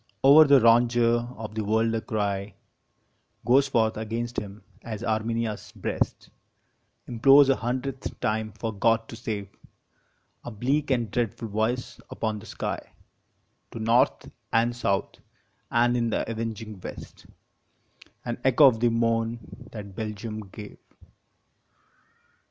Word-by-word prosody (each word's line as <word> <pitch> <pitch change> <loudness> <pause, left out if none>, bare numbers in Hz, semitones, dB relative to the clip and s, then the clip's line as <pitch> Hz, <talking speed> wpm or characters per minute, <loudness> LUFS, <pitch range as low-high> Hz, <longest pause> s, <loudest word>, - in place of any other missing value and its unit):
Over 145 +3 +9
the 140 -2 +6
rondure 120 0 +3
of 110 -1 -7
the 110 0 -2
world 110 +2 +1
a 115 - -1
cry 100 -4 -3 0.9
Goes 135 +3 +4
forth 110 -5 +1
against 115 +2 -3
him, 100 -1 -10 0.2
as 110 -1 -6
Armenia 115 0 -1
s 105 - -10
breast - - -3 0.7
Implores 135 +4 +5
a 135 - +4
hundredth 130 +3 -4
time 110 0 -1
for 115 -1 -4
God 115 +2 +1
to - - -7
save 110 -4 -4 1.0
A - - -6
bleak 135 +7 -1
and 120 -5 0
dreadful 115 -1 -2
voice 110 +4 -2
upon 110 -1 -3
the 110 - -13
sky - - -4 0.9
To - - -6
North 120 +5 +2 0.2
and 115 +1 +2
South, 100 -5 -1 0.5
and 120 +1 +2
in 120 -1 0
the - - -1
avenging 110 -2 -5
West - - -10 1.0
An 120 -1 -4
echo 135 +3 +6
of 120 -5 +5
the 120 +1 +3
moan 115 0 0 0.3
that 100 -3 -8
Belgium 110 +1 -5
gave. 105 +1 -11
115 Hz, 130 wpm, -26 LUFS, 110-120 Hz, 1.0 s, Over